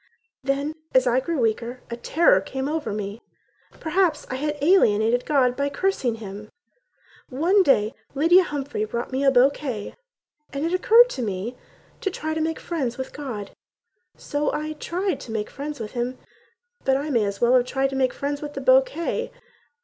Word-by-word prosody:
Then, 280 +3 -1 0.2
as 260 0 +5
I 245 +1 +3
grew 330 +4 -2
weaker, 235 +2 -1
a - - -2
terror 240 - +3
came 265 +7 -4
over 300 -7 -2
me: 205 +2 -5 0.6
Perhaps 330 -2 +1
I - - -1
had 300 +2 -2
alienated 245 - +3
God 260 -4 +3
by 280 +1 0
cursing 280 - 0
him. 210 -1 -9 0.8
One 340 +10 +3
day 240 - +3 0.2
Lydia 335 +6 +6
Humphrey 280 -8 -3
brought 235 +4 -4
me 265 +2 -1
a 275 - +6
bouquet 260 -3 +1 0.6
And 280 +2 -2
it 335 - -1
occurred 460 +6 +6
to 260 - -4
me 210 +2 -3 0.4
to 390 - -1
try 315 -4 -4
to 315 - -2
make 320 0 -1
friends 270 -9 -3
with 260 - -6
God, 235 -9 -6 0.7
So 290 0 -1
I 310 +1 -3
tried 360 +5 -2
to 230 - -9
make 215 -1 -3
friends 290 0 -6
with 215 -2 -5
Him; 250 +1 -3 0.7
But 265 0 +3
I 295 +2 -3
might 235 -4 +3
as 200 0 -3
well 240 +1 +4
have 250 -1 +5
tried 270 +1 0
to - - -4
make 260 -1 +2
friends 285 +1 -3
with 295 -1 -7
the - - -4
bouquet. - - +2
275 Hz, 180 wpm, -24 LUFS, 240-310 Hz, 0.8 s, Lydia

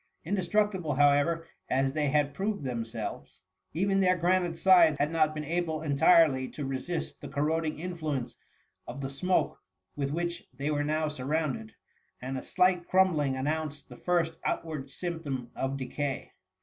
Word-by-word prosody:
"" - - -40
Indestructible, 190 -4 0
how 145 +1 +6
ever, 165 +4 +1 0.2
as 135 +1 +1
they 150 -1 +1
had 145 0 +2
proved 200 -2 -2
themselves, 115 -7 -5 0.3
even 195 +3 +1
their 185 -1 +4
granite 175 -1 +1
sides 170 -5 +6
had 150 +2 +1
not 155 -2 +2
been 150 0 -4
able 160 -1 -1
entirely 145 -2 +4
to 145 - -6
resist 135 +6 -4
the - - -6
corroding 155 +2 -1
influence 155 -7 -3 0.5
of 125 +3 -6
the 135 0 -4
smoke 180 +7 0 0.4
with 140 -1 -1
which 170 +3 -2
they 140 +3 -2
were 145 -1 0
now 155 +1 0
surrounded, 145 -5 -2 0.4
and 130 +1 -4
a 130 - -3
slight 180 -1 +2
crumbling 165 -8 +3
announced 150 +1 -3
the 125 - -11
first 170 -2 +1
outward 155 -5 -3
symp 170 +3 -4
tom 130 -6 -4
of 135 +1 -2
decay. 135 +1 -3
155 Hz, 160 wpm, -29 LUFS, 140-170 Hz, 0.5 s, how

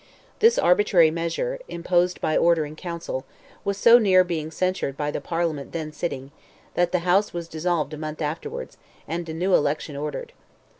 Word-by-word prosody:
This 460 +2 +5
arbitrary 180 - +4
measure—imposed 175 - -1
by 155 - 0
order 170 -2 +3
in 150 +1 -9
Council—was 170 +3 -6
so 235 +3 +7
near 190 -4 +5
being 165 -3 -3
censured 185 -5 -2
by 150 0 -1
the - - -4
Parliament 165 -4 -2
then 160 -2 -4
sitting, 140 -5 -5 0.4
that 175 0 +1
the 180 -1 -1
House 195 +4 +3
was 170 -1 -5
dissolved 160 -2 -1
a - - -5
month 155 0 -6
afterwards, 435 - -5 0.3
and 170 0 -4
a - - -4
new 180 +3 0
election 150 0 +1
ordered. 150 - -5
170 Hz, 160 wpm, -24 LUFS, 155-185 Hz, 0.4 s, so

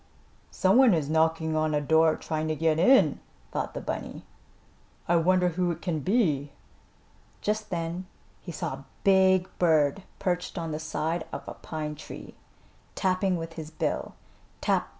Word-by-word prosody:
Some 190 +4 +3
one 255 -7 +6
is 150 -2 -1
knocking 160 0 +2
on 155 -1 +1
a - - +3
door 160 +2 +4
trying 155 0 -3
to 155 - 0
get 160 0 +1
in," 185 - +5 0.3
thought - - -3
the - - -3
bunny. - - -5 0.8
"I 175 - +3
wonder 180 +2 +3
who 175 +1 0
it 170 -1 -4
can 170 -4 -1
be?" 150 - +1 0.9
Just 215 +1 -1
then 170 +1 -3 0.3
he 175 - -7
saw 150 - -3
a 135 0 -9 0.2
big 190 -1 +4
bird 160 0 +3 0.2
perched 180 0 -2
on 165 -2 -3
the 150 - -3
side 160 +1 -2
of - - -7
a - - -5
pine 155 -1 -5
tree, 150 - -10 0.6
tapping 185 -1 +1
with 165 0 -6
his 160 -2 -7
bill. 160 - -3 0.4
"Tap! - - 0
165 Hz, 160 wpm, -27 LUFS, 155-185 Hz, 0.9 s, one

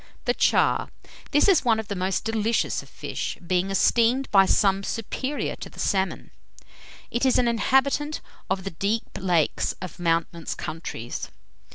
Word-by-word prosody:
THE - - +2
CHAR. - - +2 0.4
This 295 +4 +4
is 385 -5 +5
one 225 -3 +3
of 220 - -5
the 200 - -3
most 185 +3 -1
delicious 225 +1 0
of - - -16
fish, - - -5
being 180 +2 +1
esteemed 235 +6 +2
by 195 -1 +6
some 195 -1 +3
superior 260 +7 -3
to - - -8
the - - -19
salmon. 190 -2 -1 0.8
It 240 - -1
is 260 -1 +4
an 245 - +3
inhabitant 270 +6 +1 0.3
of 190 0 -1
the 195 - -4
deep 200 +7 -1 0.2
lakes 175 -5 +1
of 185 -3 -8
mountainous 165 -1 -1
countries. 155 -7 -6
200 Hz, 155 wpm, -25 LUFS, 185-240 Hz, 0.8 s, by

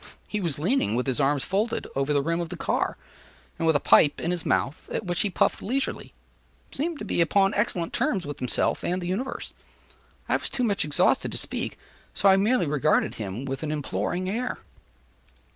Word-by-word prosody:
He 210 - -2
was 165 -7 -1
leaning 175 - +1
with 125 - 0
his 130 -1 0
arms 140 0 +2
folded, 210 +4 -1
over 135 +2 0
the 145 -1 +2
rim 165 +3 0
of 170 - -4
the - - -6
car; - - -1 0.6
and 165 - +1
with 160 - +4
a - - +4
pipe 145 +1 +5
in 170 - -1
his 175 -3 -2
mouth, 135 +5 0
at - - -2
which 175 -2 -1
he 205 - +1
puffed 180 - +1
leisurely, 265 +6 -2 0.6
seemed 320 +3 -2
to 215 - -6
be 175 - +1
upon 195 +4 +3
excellent 185 -5 -1
terms 190 -5 0
with 145 -1 -6
himself 125 - 0
and 180 +1 0
the 175 - -5
universe. 230 +9 -3 0.7
I - - +2
was - - -3
too 255 - -2
much 205 -4 +1
exhausted 145 -1 +2
to - - -3
speak, - - -3 0.4
so 200 - +3
I 190 - +8
merely 205 0 +3
regarded 145 -3 +2
him 105 +6 -4
with 135 0 -4
an 155 -1 -2
imploring 165 +5 -2
air. 240 +6 -2
175 Hz, 200 wpm, -26 LUFS, 145-205 Hz, 0.7 s, I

